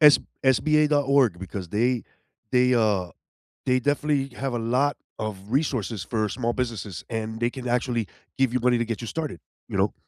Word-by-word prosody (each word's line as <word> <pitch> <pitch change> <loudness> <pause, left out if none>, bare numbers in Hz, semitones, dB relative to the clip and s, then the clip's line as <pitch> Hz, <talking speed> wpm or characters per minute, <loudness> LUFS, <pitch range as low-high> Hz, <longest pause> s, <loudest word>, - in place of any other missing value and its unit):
s 150 -2 +9 0.2
sba.org 140 - +4
because 95 -1 -6
they 120 +5 +1 0.5
they, 125 0 +4
uh 105 -6 +2 0.6
they 130 0 +3
definitely 145 0 0
have 135 -2 -2
a 120 - -1
lot 130 +5 +1 0.2
of 110 -2 -3
resources 120 - 0
for 110 0 0
small 120 +2 -1
businesses 110 -8 -4
and 110 -1 -3
they 120 0 +2
can 125 0 -6
actually 120 -3 0 0.3
give 130 -2 +2
you 125 - +2
money 125 0 +3
to 120 - +1
get 115 -2 -3
you 115 - -5
started, 150 - -4 0.3
you - - -2
know? - - +2
120 Hz, 175 wpm, -25 LUFS, 110-135 Hz, 0.6 s, s